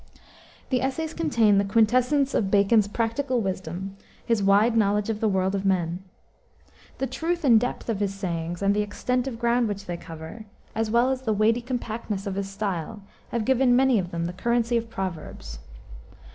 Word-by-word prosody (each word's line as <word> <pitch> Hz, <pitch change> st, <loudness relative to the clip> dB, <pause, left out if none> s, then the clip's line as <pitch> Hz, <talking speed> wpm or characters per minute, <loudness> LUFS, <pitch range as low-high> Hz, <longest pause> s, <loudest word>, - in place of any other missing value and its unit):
The 255 Hz, -2 st, +2 dB
essays 310 Hz, +4 st, -2 dB
contain 230 Hz, -11 st, +3 dB
the -, -, +2 dB
quintessence 250 Hz, +7 st, +2 dB
of 195 Hz, -, +1 dB
Bacon's 200 Hz, +1 st, +4 dB
practical 235 Hz, +4 st, -1 dB
wisdom, 190 Hz, -1 st, -4 dB, 0.3 s
his 230 Hz, -3 st, +1 dB
wide 205 Hz, +4 st, +4 dB
knowledge 210 Hz, 0 st, +2 dB
of 215 Hz, -, -4 dB
the 220 Hz, -, +1 dB
world 190 Hz, 0 st, +1 dB
of 195 Hz, -1 st, -1 dB
men. 180 Hz, -3 st, 0 dB, 1.0 s
The 270 Hz, -, -1 dB
truth 325 Hz, +7 st, -2 dB
and 235 Hz, -6 st, +6 dB
depth 245 Hz, +2 st, -4 dB
of 225 Hz, -4 st, -1 dB
his 200 Hz, -2 st, 0 dB
sayings, 175 Hz, -2 st, -4 dB
and 200 Hz, +1 st, +3 dB
the 210 Hz, -, +2 dB
extent 250 Hz, +5 st, -1 dB
of 245 Hz, -4 st, -4 dB
ground 235 Hz, 0 st, +2 dB
which 200 Hz, -1 st, -5 dB
they 175 Hz, -2 st, -4 dB
cover, 165 Hz, +6 st, -9 dB, 0.3 s
as 225 Hz, 0 st, -1 dB
well 240 Hz, +3 st, +3 dB
as 260 Hz, -1 st, -2 dB
the 225 Hz, -4 st, 0 dB
weighty 220 Hz, +3 st, +2 dB
compactness 230 Hz, -5 st, -4 dB
of 200 Hz, -, -2 dB
his 195 Hz, 0 st, -3 dB
style, 195 Hz, 0 st, -4 dB, 0.3 s
have 230 Hz, -2 st, -2 dB
given 260 Hz, -1 st, +4 dB
many 260 Hz, -3 st, +4 dB
of 175 Hz, -2 st, -3 dB
them 170 Hz, -1 st, -3 dB
the 175 Hz, -, -4 dB
currency 235 Hz, +4 st, 0 dB
of 230 Hz, 0 st, -1 dB
proverbs. 170 Hz, -, -6 dB
215 Hz, 185 wpm, -25 LUFS, 195-240 Hz, 1.0 s, and